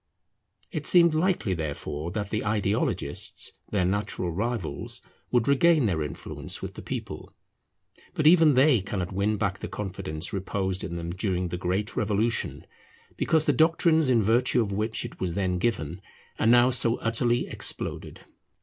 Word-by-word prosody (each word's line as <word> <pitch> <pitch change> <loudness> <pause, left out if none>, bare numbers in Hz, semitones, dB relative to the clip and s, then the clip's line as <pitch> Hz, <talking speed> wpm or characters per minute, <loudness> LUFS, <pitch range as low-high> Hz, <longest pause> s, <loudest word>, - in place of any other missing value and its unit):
It - - 0
seemed 170 -2 +6
likely 160 - +1
therefore 75 -1 -4
that 105 +2 -4
the 110 - -1
Ideologists, 105 - -1 0.2
their 95 -4 +1
natural 95 -2 -1
rivals, 105 0 -3 0.3
would 120 -2 +1
regain 150 +1 +4
their 85 -7 0
influence 75 -2 -3
with - - -6
the - - -9
people. - - -6 0.8
But 155 - -1
even 160 -3 +6
they 130 -4 +5
cannot 95 -1 -4
win 100 +3 0
back 100 -1 -1
the - - -5
confidence 95 -5 -4
reposed 95 -1 -2
in 85 - -5
them 85 0 -4
during 90 -1 -2
the 90 - -3
great 95 +4 -2
Revolution, 110 +2 0 0.5
because 160 -1 +1
the - - +3
doctrines 160 -2 +3
in 115 -4 +3
virtue 120 +4 +3
of 110 -4 0
which 110 +3 -1
it - - -9
was 90 -3 -2
then 95 -2 0
given 90 -6 -2 0.4
are - - +2
now 120 +2 +6
so 115 -1 +2
utterly 120 +1 0
exploded. - - -4
105 Hz, 155 wpm, -26 LUFS, 90-120 Hz, 0.8 s, seemed